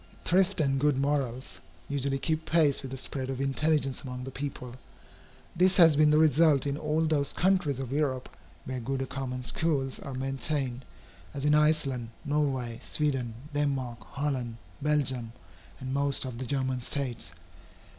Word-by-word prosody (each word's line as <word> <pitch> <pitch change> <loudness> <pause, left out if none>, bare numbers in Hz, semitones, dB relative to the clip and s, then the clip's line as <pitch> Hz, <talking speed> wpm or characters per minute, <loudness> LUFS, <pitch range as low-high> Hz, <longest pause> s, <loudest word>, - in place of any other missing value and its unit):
Thrift 190 +1 +3
and 135 -3 +2
good 145 -1 +2
morals 135 -3 -1 0.3
usually 140 -1 0
keep 160 +3 -1
pace 155 -4 +4
with 135 - -7
the 135 - -6
spread 130 0 -4
of 130 -1 -3
intelligence 140 0 +1
among 125 -1 -6
the 135 - -6
people. 130 -3 -6 0.8
This 185 +2 +4
has 165 -4 +7
been 150 +1 +5
the 150 - +5
result 155 -2 +4
in 140 -1 0
all 155 +2 0
those 145 -3 +1
countries 180 -7 +1
of 130 -2 -4
Europe 135 -3 0 0.4
where 130 0 -3
good 135 +2 -2
common 130 -2 -4
schools 135 0 0
are 135 - -7
maintained, 135 -1 -2 0.5
as 140 - -3
in 150 - +4
Iceland, 150 -6 +2 0.2
Norway, 135 -6 -1
Sweden, 135 -7 -1 0.2
Denmark, 135 -5 -1
Holland, 135 -5 -2 0.2
Belgium, 130 -6 +1 0.5
and 130 0 -4
most 140 0 +1
of 125 -2 -6
the 130 - -4
German 130 -2 0
States. 120 - -2
135 Hz, 155 wpm, -29 LUFS, 130-150 Hz, 0.8 s, has